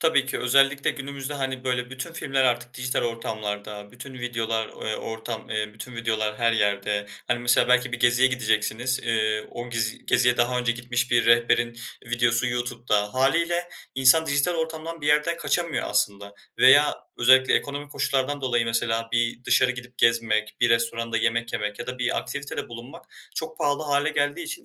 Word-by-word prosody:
Tabii - - +3
ki - - -3
özellikle 135 +2 +3
günümüzde, 140 +1 -6
hani, 130 -2 -4
böyle, 125 -1 -1
bütün 130 +5 -6
filmler 135 -4 0
artık 120 -1 0
dijital 125 0 -2
ortamlarda, 105 -3 -5
bütün 125 +3 -11
videolar, 115 -2 -2
eee, 110 - -5
ortam, 110 0 -6
eee, 105 0 -3
bütün 125 +2 -9
videolar 110 -2 -1
her 115 0 +3
yerde. 100 -1 0 0.2
Hani, 120 -1 +1
mesela 120 0 +2
belki 125 0 +3
bir 125 - -2
geziye 125 +1 +4
gideceksiniz, 120 +1 0
eee, 110 -1 0
o 120 0 -7
gezi 115 -2 -3
geziye 125 0 +3
daha 125 +1 +1
önce 120 -1 +1
gitmiş 120 0 -2
bir 120 -1 +3
rehberin 120 0 +3 0.3
videosu 120 0 +1
YouTube'da. 120 -4 -1
Hâliyle 170 +6 +1 0.3
insan 135 +5 +5
dijital 145 +4 +1
ortamdan 160 0 -4
bir 145 - -4
yerde 150 +3 +2
kaçamıyor 170 -1 -1
aslında 100 0 -1 0.2
veya 145 +3 +6 0.2
özellikle 130 +2 +5
ekonomik 145 0 -2
koşullardan 140 0 -1
dolayı 120 -3 +1
mesela 115 0 -1
bir 120 +1 0
dışarı 130 +1 +3
gidip 125 0 -9
gezmek, 115 -2 +2
bir 120 - +3
restoranda 115 0 0
yemek 115 +1 0
yemek 105 0 -3
ya 120 - -6
da 125 0 -6
bir 125 -1 0
aktivitede 140 0 -5
bulunmak 120 +8 -10 0.3
çok 160 0 -5
pahalı 145 +1 0
hâle 145 +1 +1
geldiği 145 - -1
için 340 +1 -7
120 Hz, 170 wpm, -25 LUFS, 115-135 Hz, 0.3 s, veya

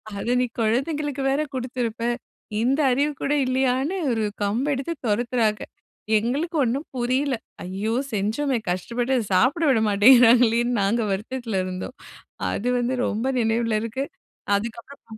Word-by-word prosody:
"அத 200 - -5
நீ 250 - +2
குழந்தைகளுக்கு 275 +5 0
வேறு 285 +3 +1
கொடுத்திருப்ப. 245 -3 -3 0.6
இந்த 265 +5 +2
அறிவு 285 +4 +1
கூட 285 - 0
இல்லயான்னு." 260 +6 +1
ஒரு 225 -2 0 0.2
கம்பு 225 +8 0
எடுத்து 275 +6 -3
துரத்துறாங்க. 225 0 +1 0.6
எங்களுக்கு 290 +10 -2
ஒன்னும் 265 +6 -2
புரியல. 255 +2 0 0.3
ஐயோ! 195 +5 -3 0.2
செஞ்சோமே 225 +7 0
கஷ்டப்பட்டு 235 +8 -1
அத 230 - -1
சாப்பிட 260 - +3
விட 225 -4 +3
மாட்டேங்கிறாங்களேன்னு 235 +1 +5
நாங்க 215 +4 +1
வருத்தத்தில 220 0 -2
இருந்தோம். 185 +7 -6 0.5
அது 240 - -3
வந்து 245 +2 0
ரொம்ப 220 +4 -2
நினைவில 225 -1 +1
இருக்கு. 260 +5 -3 0.5
அதற்கு 225 +3 -3
அப்புறம், 230 -4 -14
240 Hz, 130 wpm, -24 LUFS, 220-265 Hz, 0.6 s, மாட்டேங்கிறாங்களேன்னு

